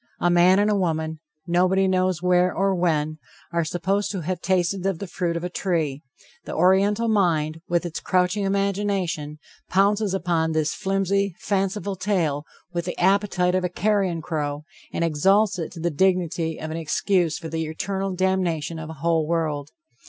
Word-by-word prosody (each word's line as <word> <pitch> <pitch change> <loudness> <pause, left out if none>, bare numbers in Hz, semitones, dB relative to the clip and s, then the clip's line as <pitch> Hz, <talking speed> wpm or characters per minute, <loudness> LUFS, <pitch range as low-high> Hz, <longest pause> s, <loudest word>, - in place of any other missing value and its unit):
A 175 - +2
man 175 +2 +5
and 205 +1 +3
a - - +2
woman, 160 -4 -1 0.3
nobody 185 +2 +2
knows 185 -2 +1
where 180 0 +3
or 195 +1 +1
when, 155 -4 0 0.3
are 170 0 +2
supposed 185 +5 -1
to 195 -3 -3
have 180 +2 -3
tasted 185 0 0
of 195 -3 0
the 200 - -5
fruit 170 -1 -2
of 170 - -5
a - - -1
tree; 160 -7 -1 0.4
the - - -5
Oriental 195 +6 +3
mind, 165 -7 +1
with 175 0 +1
its 165 -2 -4
crouching 185 +2 +1
imagination, 195 -6 -1 0.3
pounces 200 +1 +2
upon 165 -3 0
this 155 -1 0
flimsy, 195 -1 0
fanciful 195 0 -1
tale 175 -7 -1 0.3
with 170 -1 -2
the 180 - -4
appetite 190 -1 +2
of 185 0 +1
a 180 - 0
carrion 190 -3 0
crow, 150 -3 -3 0.3
and - - -1
exalts 190 +6 +3
it 165 - -4
to 170 - -9
the 170 +1 -1
dignity 170 -1 +1
of 155 - -5
an 160 - -3
excuse 165 +1 +1
for 165 - -7
the 160 0 -2
eternal 190 +4 -3
damnation 175 -4 0
of 155 -1 -7
a - - -6
whole 165 -2 +2
world. 155 -3 -1
180 Hz, 175 wpm, -24 LUFS, 160-195 Hz, 0.4 s, man